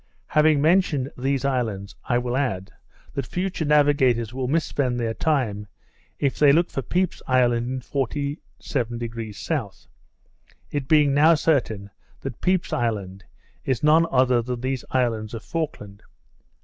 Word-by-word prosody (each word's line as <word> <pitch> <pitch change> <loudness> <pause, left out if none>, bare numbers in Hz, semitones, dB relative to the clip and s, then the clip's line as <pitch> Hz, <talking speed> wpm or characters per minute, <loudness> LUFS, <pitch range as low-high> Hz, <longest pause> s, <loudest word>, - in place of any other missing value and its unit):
Having 150 -1 +4
mentioned 155 -5 +2
these 135 +1 -1
islands, 110 -7 -2
I 120 - +1
will 125 0 -2
add, 95 -9 -2 0.4
that 140 - -3
future 180 -3 -2
navigators 140 -6 +3
will 130 -1 -2
mis 160 +4 +1
spend 125 -4 -1
their 115 -1 -1
time, 110 -9 -1 0.5
if 140 -3 -1
they 145 -2 +7
look 170 +4 +2
for 135 - -2
Pepy's 180 +7 -1
Island 120 -2 +2
in 130 0 -3
47° 120 -5 -4 0.2
S.; - - -23 0.8
it 145 -2 -3
being 150 -2 +4
now 155 +4 +6
certain, 115 -10 0 0.3
that 135 -3 -7
Pepy's 185 0 +1
Island 100 -5 -2 0.4
is 130 -1 -1
no 155 +2 +5
other 130 -5 +3
than 120 0 -4
these 130 -1 -2
islands 115 -3 -1
of 110 - -7
Falkland. 105 -12 -5
130 Hz, 140 wpm, -24 LUFS, 115-150 Hz, 0.8 s, they